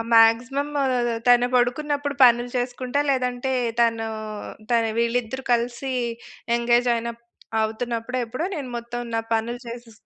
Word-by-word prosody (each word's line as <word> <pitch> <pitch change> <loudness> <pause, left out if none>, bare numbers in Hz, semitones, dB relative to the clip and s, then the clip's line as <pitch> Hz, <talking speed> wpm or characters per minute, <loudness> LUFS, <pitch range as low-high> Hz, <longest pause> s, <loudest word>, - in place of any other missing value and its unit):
maximum 245 +6 +4 0.6
తను 245 0 +6
పడుకున్నప్పుడు 285 +3 0
పనులు 240 0 +5
చేసుకుంటా, 250 +2 -2
లేదంటే 250 0 -1 0.3
తను 225 -1 +2 0.6
తను 230 -1 +3
వీళ్ళిద్దరూ 235 +2 -1
కలిసి 240 +3 -1 0.6
ఎంగేజ్ 240 +1 +3
అయినప్ 235 0 -4 0.4
అవుతున్నప్పుడో 230 +2 -3
ఎప్పుడో 255 +8 -3
నేను 280 -5 -5
మొత్తం 235 +1 -5
నా 225 - +1
పనులు 235 +2 -2
చేసే 235 0 -8
240 Hz, 115 wpm, -24 LUFS, 235-255 Hz, 0.6 s, తను